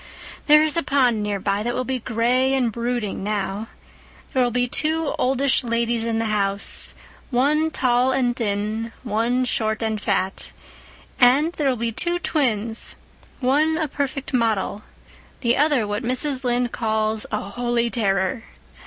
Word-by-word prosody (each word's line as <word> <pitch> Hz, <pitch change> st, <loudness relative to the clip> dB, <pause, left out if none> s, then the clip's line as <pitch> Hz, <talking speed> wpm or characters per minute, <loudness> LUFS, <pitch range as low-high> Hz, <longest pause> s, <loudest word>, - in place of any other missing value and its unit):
There 300 Hz, 0 st, +7 dB
is 310 Hz, +1 st, +2 dB
a -, -, +3 dB
pond 255 Hz, -6 st, +2 dB
nearby 200 Hz, -1 st, -1 dB
that 240 Hz, +2 st, -2 dB
will 255 Hz, -, -1 dB
be 260 Hz, 0 st, -2 dB
gray 250 Hz, +3 st, +1 dB
and 250 Hz, -4 st, +1 dB
brooding 235 Hz, -3 st, -3 dB
now. 205 Hz, +1 st, -2 dB, 0.7 s
There 260 Hz, -, +2 dB
will 245 Hz, -, +3 dB
be 245 Hz, +1 st, 0 dB
two 315 Hz, +3 st, 0 dB
oldish 265 Hz, +1 st, +2 dB
ladies 235 Hz, -1 st, 0 dB
in 230 Hz, -1 st, -1 dB
the 225 Hz, -, 0 dB
house, 200 Hz, -1 st, -1 dB, 0.3 s
one 295 Hz, +5 st, +2 dB
tall 255 Hz, -3 st, +2 dB
and 245 Hz, -2 st, +1 dB
thin, 220 Hz, 0 st, -2 dB
one 240 Hz, +3 st, 0 dB
short 220 Hz, -2 st, -1 dB
and 220 Hz, -1 st, -1 dB
fat; 195 Hz, -2 st, -1 dB, 0.7 s
and 280 Hz, +6 st, +5 dB
there 290 Hz, -5 st, 0 dB
will 255 Hz, -, +1 dB
be 230 Hz, 0 st, -2 dB
two 345 Hz, +10 st, 0 dB
twins, 235 Hz, -10 st, 0 dB, 0.5 s
one 300 Hz, +5 st, +2 dB
a 315 Hz, -2 st, 0 dB
perfect 275 Hz, 0 st, -4 dB
model, 220 Hz, -4 st, 0 dB, 0.6 s
the 235 Hz, -1 st, +2 dB
other 290 Hz, -5 st, +2 dB
what 205 Hz, +1 st, -2 dB
Mrs. 255 Hz, +2 st, 0 dB
Lynde 245 Hz, -1 st, 0 dB
calls 220 Hz, -1 st, -1 dB
a 210 Hz, -, 0 dB
'holy 235 Hz, +3 st, -1 dB
terror. 200 Hz, +1 st, 0 dB
240 Hz, 155 wpm, -22 LUFS, 220-265 Hz, 0.7 s, There